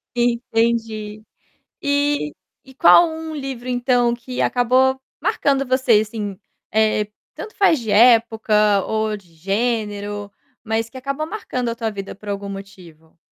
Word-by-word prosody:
Entendi. 225 -3 -1 0.6
E 285 - 0 0.3
e 265 - -16
qual 340 +3 +7
um 320 0 -6
livro 270 -4 -6
então 245 -1 +2
que 245 +1 -5
acabou 260 +2 +2 0.2
marcando 275 -1 +1
você, 255 -4 +3
assim, 210 -3 -5 0.3
eh, 215 -1 +2 0.3
tanto 435 - -9
faz 355 -7 +3
de 225 -2 -6
época 220 -2 +4
ou 220 -1 -1
de 175 -5 -21
gênero, 205 +1 -2 0.3
mas 225 0 -1
que 260 - -11
acabou 275 +4 -3
marcando 285 - -4
a 230 - -3
tua 225 -1 -2
vida 200 -2 -7
por 205 +1 -11
algum 200 0 -4
motivo? 180 -5 -12
230 Hz, 135 wpm, -20 LUFS, 210-255 Hz, 0.6 s, qual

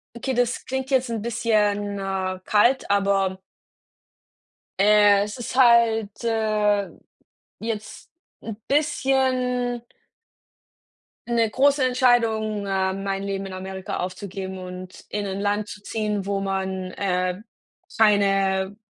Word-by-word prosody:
okay, 260 +2 -3
das 245 0 0
klingt 265 0 -3
jetzt 260 -2 +2
'n, 225 -2 -3
bisschen, 210 -3 0
äh, 190 -1 -3
kalt, 240 +3 +3
aber 195 -2 +1 1.4
äh, 205 0 +5
es 210 +4 -6
ist 245 - -6
halt, 230 -4 +4
äh, 215 -3 +1 0.7
jetzt 220 -1 -6 0.3
'n 225 -2 -6
bisschen 260 -4 +1 1.5
'ne 230 -2 +2
große 275 +3 +3
Entscheidung, 230 -5 +2
ähm, 190 0 -1
mein 195 0 -2
Leben 195 0 -3
in 190 - -8
Amerika 190 0 -5
aufzugeben 190 +1 -5
und 180 0 -9
in 205 -1 -3
ein 195 +1 -4
Land 205 +1 0
zu 205 0 -10
ziehen, 210 -3 -2
wo 200 0 -1
man, 190 -1 -3
äh, 185 0 -1 0.6
keine 195 -2 +2
205 Hz, 115 wpm, -23 LUFS, 195-235 Hz, 1.5 s, äh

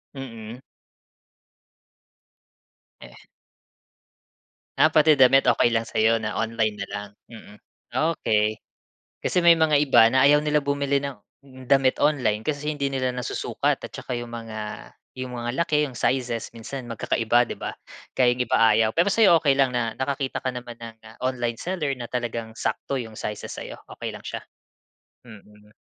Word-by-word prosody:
Mm. 115 -3 -8 2.4
Eh - - -13 1.6
Ah, 155 - +5
pati 155 -1 +5
damit 135 0 +5
okey 120 0 +3
lang 115 0 0
sa - - -6
'yo 115 +1 +3
na 105 - -3
online 110 -1 -1
na - - -5
lang, 100 0 -5 0.2
mm, 110 -2 -13 0.6
okey. 110 -5 0 0.6
Kasi - - +1
may 170 -1 +7
mga 155 -2 +3
iba, 140 -5 +6
na 130 +2 +5
ayaw 150 +1 +4
nila 150 0 +2
bumili 140 0 0
ng, 140 -1 -5 0.5
damit 135 -1 +3
online, 125 -8 +1
kasi 150 +1 -2
hindi 140 -1 -1
nila 130 -1 -1
nasusukat, 125 -1 -2
at - - -7
tsaka - - -6
'yong 120 0 -7
mga, 110 -2 -7 0.3
'yong 130 -1 -5
mga 120 0 -3
laki, 155 -2 0
'yong 125 -3 -10
sizes, 120 -2 -1
minsan 120 +3 -7
magkakaiba, 115 +1 +1
'di - - -5
ba? - - -4 0.4
Kaya 125 -2 +4
yung 125 - 0
iba - - +1 0.2
ayaw, 110 0 +3
pero 170 +4 +3
sa'yo 195 -6 +5
okay 140 -3 +3
lang 135 -2 +3
na, 115 -2 0
nakakita 135 0 -2
ka 130 - 0
naman 120 -1 -8
ng 115 -1 -10 0.3
online 120 -3 -1
seller, 175 -6 -2
na 120 - -6
talagang 115 -2 -4
sakto 140 - -3
'yong 110 -3 -8
sizes 105 -1 -5
sa'yo, - - -7 0.2
okey - - -4
lang - - -10
siya? - - -6 0.8
Mm. 105 -2 -16
125 Hz, 160 wpm, -24 LUFS, 115-140 Hz, 2.4 s, may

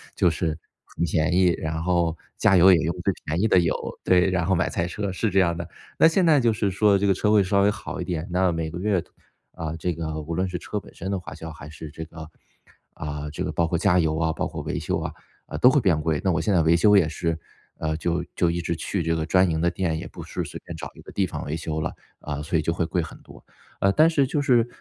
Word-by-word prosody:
就 85 - +3
是 80 -1 -2 0.3
很 - - -4
便 80 0 +1
宜， 90 0 +4
然 80 0 -3
后 85 -2 +1 0.2
加 - - +5
油 95 +2 +8
也 85 - +4
用 85 +3 -1
最 100 - +2
便 80 +3 -1
宜 110 - +3
的 95 - +5
油。 85 -2 +1 0.3
对， 90 0 +4
然 90 -2 0
后 95 - +3
买 85 - +1
菜 85 -1 -1
车， 100 +2 -3
是 105 +4 -1
这 95 0 +2
样 85 -2 +1
的。 85 0 -6 0.3
那 - - +8
现 175 +3 +2
在 155 -3 +5
就 120 -3 +3
是 105 -2 0
说 100 +1 +4
这 100 - 0
个 100 - +4
车 105 +3 +1
会 105 -2 +5
稍 100 +1 +2
微 100 - +4
好 105 -3 -5
一 - - -1
点， 85 -2 -3
那 90 0 +2
每 80 -1 -3
个 90 - -6
月， 95 -2 +1 0.5
啊， 80 -1 -5
这 85 +2 -1
个 80 -1 -4
无 80 +3 -5
论 95 +1 0
是 90 - -3
车 105 - -4
本 - - -16
身 95 +3 -5
的 100 - -1
花 90 - -9
销， 80 0 -8
还 75 -2 -11
是 75 0 -9
这 80 +1 -7
个， 80 -1 -10 0.7
啊， 75 0 -5
这 - - -4
个 - - -2
包 85 - +1
括 85 - 0
加 90 +1 +3
油 80 -2 +1
啊， 80 -1 +1
包 - - -2
括 - - -6
维 - - -3
修 - - -1
啊， - - -4 0.3
呃， - - -7
都 125 - +7
会 145 - +4
变 85 -8 +2
贵。 80 -1 0
那 95 - +2
我 80 -2 0
现 95 - 0
在 90 - +4
维 80 +1 +4
修 105 +4 +5
也 90 -5 +4
是， 80 0 -2 0.4
呃， 80 0 -2
就 85 +1 -1
就 85 - +2
一 85 - -2
直 85 - -2
去 85 +3 -2
这 80 0 0
个 80 -1 -1
专 95 +3 +3
营 80 -1 -1
的 85 - +3
店， 85 -3 -1
也 85 +1 -6
不 - - -10
是 - - -4
随 - - -7
便 - - -7
找 - - -6
一 - - -13
个 - - -12
地 100 - +1
方 - - -6
维 75 - -3
修 80 -1 -3
了， 80 - -3 0.3
啊， 75 -1 -5
所 80 +2 0
以 - - +1
就 85 +2 0
会 85 0 -1
贵 85 +2 -1
很 80 - -8
多。 - - -15 0.4
啊， 100 - +3
但 155 +10 +5
是 145 -4 +2
就 145 +2 0
是， 120 -4 +3
85 Hz, 300 characters per minute, -24 LUFS, 80-95 Hz, 0.7 s, 油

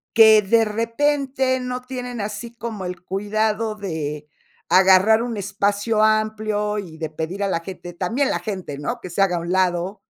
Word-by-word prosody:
que 220 -1 +8
de 225 +3 +3
repente 260 +4 0
no 250 0 -4
tienen 250 -2 -5
así 210 +3 -6
como 225 -5 -5
el 180 0 -6
cuidado 215 +2 -1
de 155 -7 -5 0.4
agarrar 190 +5 +6
un 235 -3 -4
espacio 205 +2 0
amplio, 215 -1 +1
y 165 -5 -9
de 160 -1 -4
pedir 170 +6 -4
a - - +1
la 165 - 0
gente, 175 -1 -8
también 230 +11 0
la - - -1
gente, 185 -9 -5
¿no?, 240 +11 -3
que 185 - -7
se 195 - 0
haga 180 -2 +1
a - - -1
un 170 +1 -4
lado. 185 +1 0
210 Hz, 175 wpm, -22 LUFS, 185-230 Hz, 0.4 s, que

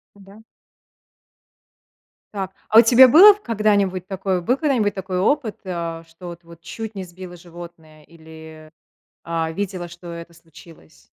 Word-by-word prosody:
Да. 200 +2 -17 1.9
Так. 190 -1 -5 0.2
А 220 - +7
у - - +10
тебя 250 +3 +7
было 385 - +8
в 415 - -20
когда-нибудь 200 -5 0
такое, 190 -2 -3
был 245 +10 0
когда-нибудь 255 -10 0
такой 185 -1 -4
опыт, 225 0 -1
а, 170 -2 -5
что 170 +2 -12
вот 170 0 -12
вот 170 0 -16
чуть 220 +6 -8
не 190 - -6
сбила 180 0 -11
животное 170 -2 -14
или, 160 -1 -15 0.5
а, 165 -1 -3
видела, 180 0 -5
что 175 +1 -14
это 170 0 -10
случилось? 165 - -19
180 Hz, 145 wpm, -20 LUFS, 165-205 Hz, 1.9 s, у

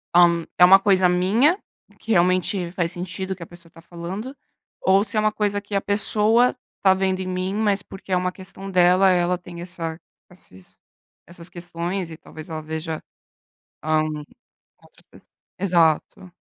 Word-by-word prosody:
hã, 170 -1 +5
é 180 - +8
uma 190 +2 +8
coisa 190 -2 +3
minha, 210 - +3 0.4
que 225 - -5
realmente 180 -1 +1
faz 175 -2 -2
sentido 185 +2 -4
que 175 - -9
a - - -8
pessoa 170 -1 -16
tá 165 - -16
falando, 180 +10 -7 0.5
ou 195 +1 +4
se 215 +1 -2
é - - +4
uma 215 0 +2
coisa 205 -1 -1
que 205 +1 -12
a 195 - +2
pessoa 215 +4 +2 0.3
tá 190 -1 +5
vendo 190 0 0
em 185 - -4
mim, 185 +1 -2
mas 205 -2 +1
porque 195 -1 -12
é 185 - +3
uma 180 0 -1
questão 190 +1 -9
dela, 185 +1 +4
ela 180 0 +2
tem 175 -1 -10
essa 165 -2 -5 0.3
esses 95 - -15 0.5
essas 175 0 -10
questões 175 +1 -4
e 160 - -9
talvez 155 0 -12
ela 155 -1 -5
veja, 160 0 -5 0.8
hã 155 0 +2
com 155 +10 -7 0.5
certeza. - - -21 0.3
Exato, 175 0 +1
180 Hz, 170 wpm, -22 LUFS, 170-195 Hz, 0.8 s, é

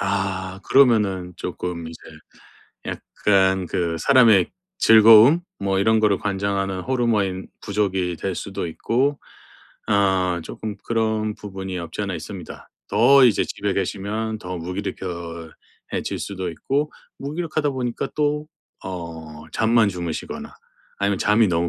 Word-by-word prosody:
아. 95 -1 -2
그러면은 105 -9 +3
쪼끔 85 -2 -5
이제 80 - -10 0.9
약간 95 -2 +1
그 85 -1 -1
사람의 115 - +5 0.3
즐거움? 115 +8 +8 0.2
뭐 95 -1 0
이런 110 +2 +3
거를 105 -3 +3
관장하는 100 -1 -1
호르몬이 110 -7 0 0.2
부족이 95 -4 -1
될 95 +2 -3
수도 95 -1 -4
있고 130 - 0 0.7
어 95 -4 +2
쪼끔 105 +4 -6
그런 110 -2 0
부분이 95 -2 -6
없지 85 +4 -5
않아 100 -2 -3
있습니다. 85 +1 -8 0.2
더 130 +5 +6
이제 115 - +2
집에 100 -1 -3
계시면 105 +3 -2
더 90 -2 -6
무기력 90 +4 -4
겨 85 -3 -6 0.4
해질 - - -2
수도 95 -2 -4
있고 140 - -2 0.3
무기력하다 155 0 -2
보니까 125 -3 -3
또 150 0 0 0.4
어 80 -4 -7
잠만 115 -1 +3
주무시거나 85 -4 -5 0.4
아니면 100 -1 0
잠이 105 +1 +3
너무 85 -1 +1
100 Hz, 270 characters per minute, -22 LUFS, 90-110 Hz, 0.9 s, 즐거움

